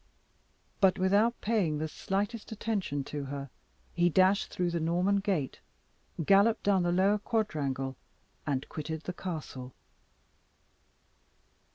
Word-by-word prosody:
But 190 -2 +4
without 205 +5 +3
paying 200 -9 +1
the 155 +1 -2
slightest 205 +8 -3
attention 200 -10 -2
to 145 0 -5
her, 140 -1 -6 0.4
he 175 0 +3
dashed 190 +4 +4
through 180 -1 -1
the 170 - -1
Norman 175 +5 +2
Gate, 190 -9 -1 0.7
galloped 200 +5 +5
down 200 -2 +3
the 175 0 +1
lower 195 +4 +3
quadrangle, 140 - -1 0.5
and 135 -2 -1
quitted 160 0 -5
the 180 - -5
castle. 150 -9 -6
180 Hz, 120 wpm, -30 LUFS, 150-200 Hz, 0.7 s, galloped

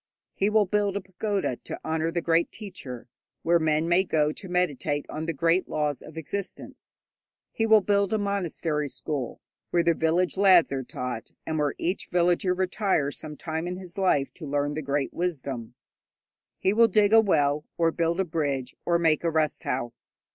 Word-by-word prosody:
He 200 - +1
will 210 -1 +4
build 205 0 0
a - - -3
pagoda 190 - -2
to - - -9
the - - -8
honour 160 0 0
of 165 - -4
the 170 - 0
great 165 +1 +2
teacher, 145 - -8 0.4
where 170 +1 +4
men 155 0 +1
may 175 +2 +4
go 150 -4 +1
to 185 +4 -8
meditate 150 -5 0
on 155 +1 -4
the - - +1
great 165 +4 +1
laws 150 -3 -1
of 160 - -12
existence. 190 +5 -6 0.5
He 225 - 0
will 220 -1 +7
build 200 0 +1
a 220 - +2
monastery 170 -7 -1
school 140 -3 -4 0.3
where 170 -1 +2
the 170 0 +4
village 170 +4 +1
lads 190 -6 +6
are 135 -1 -1
taught, 125 -2 -6
and 160 -1 -2
where 145 -1 0
each 180 +4 -2
villager 180 +1 +2
retires 185 -6 0
some 150 -1 -7
time 160 +2 -3
in 180 0 -4
his 185 -2 -9
life 180 -8 +1
to 155 - -9
learn 145 +1 0
the 155 - -3
great 140 -1 -1
wisdom. 135 -9 -3 0.8
He 190 - +1
will 230 +1 +6
dig 210 0 +3
a 225 - +9
well 150 -7 +2
or 165 -1 +3
build 170 +1 0
a 190 - +2
bridge, 145 -6 -2
or 170 -1 +2
make 160 -2 +2
a 170 - +2
rest 155 -1 0
house. 125 -2 -4
165 Hz, 190 wpm, -26 LUFS, 150-190 Hz, 0.8 s, a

